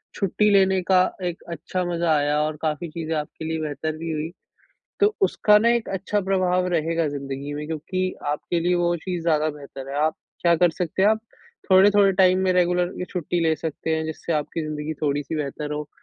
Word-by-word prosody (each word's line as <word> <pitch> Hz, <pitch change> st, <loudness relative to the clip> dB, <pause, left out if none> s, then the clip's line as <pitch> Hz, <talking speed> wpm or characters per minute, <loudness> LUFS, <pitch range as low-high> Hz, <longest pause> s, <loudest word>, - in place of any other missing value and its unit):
छुट्टी 210 Hz, +2 st, +1 dB
लेने 190 Hz, -1 st, +4 dB
का 185 Hz, -1 st, +6 dB, 0.2 s
एक 175 Hz, -1 st, -4 dB
अच्छा 175 Hz, +3 st, -3 dB
मज़ा 170 Hz, -1 st, 0 dB
आया 145 Hz, +1 st, +1 dB
और 155 Hz, 0 st, -1 dB
काफ़ी 155 Hz, +1 st, -2 dB
चीज़े 165 Hz, 0 st, -4 dB
आपके 150 Hz, +1 st, -5 dB
लिए 160 Hz, 0 st, -2 dB
बेहतर 155 Hz, +1 st, -3 dB
भी 165 Hz, +1 st, -4 dB
हुई। 155 Hz, +1 st, -3 dB, 0.7 s
तो 415 Hz, +1 st, +4 dB
उसका 210 Hz, -, +4 dB
ना 225 Hz, +2 st, +3 dB
एक 235 Hz, -1 st, -2 dB
अच्छा 195 Hz, +2 st, -1 dB
प्रभाव 185 Hz, -1 st, +1 dB
रहेगा 165 Hz, -1 st, +1 dB
ज़िंदगी 140 Hz, 0 st, -5 dB
में 150 Hz, +1 st, -5 dB
क्योंकि 185 Hz, +4 st, -3 dB
आपके 150 Hz, +4 st, -1 dB
लिए 175 Hz, +2 st, +2 dB
वो 175 Hz, 0 st, +2 dB
चीज़ 175 Hz, +1 st, -4 dB
ज़्यादा 155 Hz, -2 st, +2 dB
बेहतर 140 Hz, -2 st, -10 dB
है, 140 Hz, -, -4 dB
आप 155 Hz, +2 st, +2 dB, 0.3 s
क्या 170 Hz, -1 st, +5 dB
कर 175 Hz, +1 st, +4 dB
सकते 175 Hz, +2 st, -2 dB
हैं, 200 Hz, -, +6 dB
आप 220 Hz, 0 st, +2 dB, 0.5 s
थोड़े-थोड़े 195 Hz, +1 st, +6 dB
टाइम 185 Hz, -1 st, +4 dB
में 185 Hz, -, +3 dB
रेगुलर 180 Hz, 0 st, +2 dB
ये -, -, -2 dB
छुट्टी 175 Hz, -1 st, -2 dB
ले 160 Hz, -1 st, +3 dB
सकते 160 Hz, 0 st, -3 dB
हैं 160 Hz, -, -2 dB
जिससे 160 Hz, +1 st, -4 dB
आपकी 155 Hz, +1 st, -2 dB
ज़िंदगी 155 Hz, 0 st, -4 dB
थोड़ी-सी 145 Hz, 0 st, -1 dB
बेहतर 150 Hz, 0 st, -4 dB
हो। 150 Hz, 0 st, -4 dB
165 Hz, 200 wpm, -23 LUFS, 150-185 Hz, 0.7 s, का